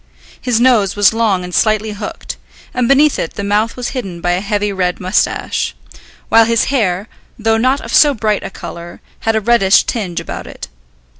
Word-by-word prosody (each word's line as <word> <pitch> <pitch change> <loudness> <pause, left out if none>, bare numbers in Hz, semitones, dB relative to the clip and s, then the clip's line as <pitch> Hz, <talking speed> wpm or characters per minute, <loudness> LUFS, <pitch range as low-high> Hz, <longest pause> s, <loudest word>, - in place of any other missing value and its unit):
His 245 -3 +1
nose 235 -6 +3
was 205 0 +4
long 215 -5 +1
and 180 0 -8
slightly 215 +1 +1
hooked, 205 0 -7 0.4
and 250 -1 0
beneath 285 +3 +4
it 165 - -4
the 200 - -4
mouth 210 +4 0
was 245 -1 -3
hidden 195 -10 -5
by 175 +1 -1
a 180 +1 0
heavy 205 0 -1
red 180 -2 -1
moustache; 185 +2 -1 0.5
while 225 0 +5
his 230 0 +2
hair, 200 -5 0 0.3
though 225 -1 +1
not 255 +5 +1
of 230 - -7
so 290 -2 +5
bright 215 -2 0
a - - -5
colour, 170 -2 -9 0.3
had 225 - +2
a 220 - +1
reddish 205 -3 +4
tinge 195 -8 -3
about - - -7
it. - - -9
215 Hz, 190 wpm, -15 LUFS, 190-235 Hz, 0.5 s, while